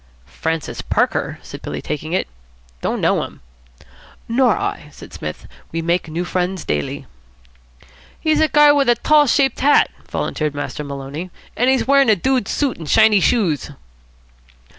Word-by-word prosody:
"'Francis 160 Hz, -1 st, -4 dB
Parker'?" -, -, 0 dB
said -, -, -10 dB
Billy, 75 Hz, 0 st, -5 dB
taking 150 Hz, -, -5 dB
it. 185 Hz, -, 0 dB, 0.5 s
"Don't -, -, -2 dB
know -, -, +2 dB
him." -, -, -10 dB, 0.9 s
"Nor 245 Hz, +2 st, +3 dB
I," -, -, -4 dB
said -, -, -13 dB
Psmith. -, -, -7 dB, 0.2 s
"We 165 Hz, 0 st, -3 dB
make 170 Hz, +1 st, 0 dB
new 170 Hz, +3 st, -3 dB
friends 180 Hz, 0 st, -2 dB
daily." 75 Hz, -1 st, -3 dB, 1.1 s
"He's 310 Hz, -1 st, +1 dB
a 315 Hz, -, +4 dB
guy 295 Hz, -1 st, +6 dB
with 280 Hz, -3 st, +2 dB
a 240 Hz, -, +5 dB
tall 300 Hz, +3 st, +4 dB
shaped 270 Hz, +1 st, +2 dB
hat," 290 Hz, +2 st, +4 dB, 0.2 s
volunteered 150 Hz, -2 st, -2 dB
Master 145 Hz, +1 st, -4 dB
Maloney, 140 Hz, +5 st, -6 dB, 0.3 s
"an' 245 Hz, -, +1 dB
he's 265 Hz, -1 st, +2 dB
wearin' 275 Hz, -2 st, +5 dB
a 215 Hz, -, +6 dB
dude 255 Hz, +3 st, 0 dB
suit 280 Hz, -4 st, -1 dB
an' 160 Hz, -, -8 dB
shiny 220 Hz, +3 st, +5 dB
shoes." 180 Hz, -, +1 dB
195 Hz, 155 wpm, -19 LUFS, -, 1.1 s, guy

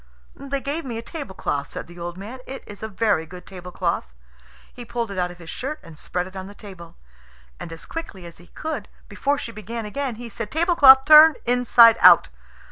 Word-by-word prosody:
"They 275 Hz, 0 st, -5 dB
gave 290 Hz, +5 st, -4 dB
me 240 Hz, -5 st, -6 dB
a 230 Hz, -, -6 dB
tablecloth," 190 Hz, -, -5 dB
said -, -, -7 dB
the 175 Hz, +1 st, -14 dB
old 175 Hz, +1 st, -6 dB
man; 220 Hz, +7 st, -9 dB
"it's 255 Hz, -6 st, -10 dB
a 220 Hz, -, -4 dB
very 205 Hz, -6 st, 0 dB
good 180 Hz, +2 st, -12 dB
tablecloth." 180 Hz, -, -5 dB, 0.6 s
He 245 Hz, -, -9 dB
pulled 235 Hz, -2 st, -4 dB
it 190 Hz, -, -4 dB
out 180 Hz, 0 st, -1 dB
of 175 Hz, -, -12 dB
his 170 Hz, -1 st, -10 dB
shirt 300 Hz, +4 st, -5 dB
and 165 Hz, -, -13 dB
spread 180 Hz, +4 st, -4 dB
it 190 Hz, +1 st, -13 dB
on 190 Hz, 0 st, -7 dB
the 205 Hz, -, -13 dB
table; 185 Hz, -6 st, -12 dB, 0.6 s
and -, -, -8 dB
as 165 Hz, -, -10 dB
quickly 270 Hz, -, -8 dB
as 170 Hz, -1 st, -12 dB
he 175 Hz, -, -17 dB
could, 300 Hz, -10 st, -6 dB, 0.2 s
before 280 Hz, +8 st, -1 dB
she 255 Hz, -4 st, -6 dB
began 225 Hz, +1 st, -7 dB
again, 260 Hz, +3 st, -4 dB
he 240 Hz, +2 st, -9 dB
said, 230 Hz, -1 st, -7 dB
"Tablecloth, 295 Hz, -, +6 dB
turn 310 Hz, 0 st, +8 dB
inside 240 Hz, -2 st, +5 dB
out!" -, -, +7 dB
225 Hz, 205 wpm, -22 LUFS, 180-270 Hz, 0.6 s, turn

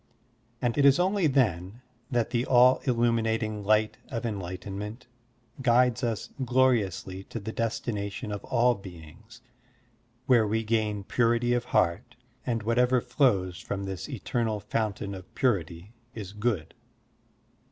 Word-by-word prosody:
And 120 Hz, +3 st, +1 dB
it -, -, +4 dB
is 140 Hz, -1 st, +6 dB
only 185 Hz, -1 st, +2 dB
then 115 Hz, -, 0 dB, 0.3 s
that 120 Hz, -3 st, 0 dB
the 120 Hz, -1 st, +1 dB
all 125 Hz, 0 st, +6 dB
illimiinating 115 Hz, -3 st, +1 dB
light 110 Hz, +1 st, +2 dB
of 120 Hz, -2 st, -4 dB
enlightenment 100 Hz, +2 st, -5 dB, 0.6 s
guides 125 Hz, 0 st, +3 dB
us 115 Hz, -3 st, -2 dB
gloriously 115 Hz, -7 st, +1 dB
to 115 Hz, -, -6 dB
the 110 Hz, +1 st, -5 dB
destination 105 Hz, -3 st, -3 dB
of 105 Hz, -, -5 dB
all 125 Hz, 0 st, +3 dB
beings, 95 Hz, +3 st, -13 dB, 0.8 s
where 120 Hz, -4 st, +4 dB
we 110 Hz, +2 st, 0 dB
gain 110 Hz, -2 st, 0 dB
ptuity 120 Hz, +3 st, +2 dB
of 120 Hz, 0 st, -1 dB
heart, 120 Hz, +6 st, 0 dB, 0.3 s
and 115 Hz, -3 st, -1 dB
whatever 125 Hz, +3 st, +3 dB
flows 95 Hz, -10 st, +1 dB
from 100 Hz, -, -4 dB
this 95 Hz, +6 st, -5 dB
eternal 115 Hz, -3 st, -2 dB
fountain 105 Hz, -1 st, -2 dB
of 95 Hz, -1 st, -10 dB
purity 95 Hz, -, -1 dB, 0.2 s
is 100 Hz, -3 st, -7 dB
good. 105 Hz, -7 st, -2 dB
115 Hz, 130 wpm, -28 LUFS, 100-120 Hz, 0.8 s, is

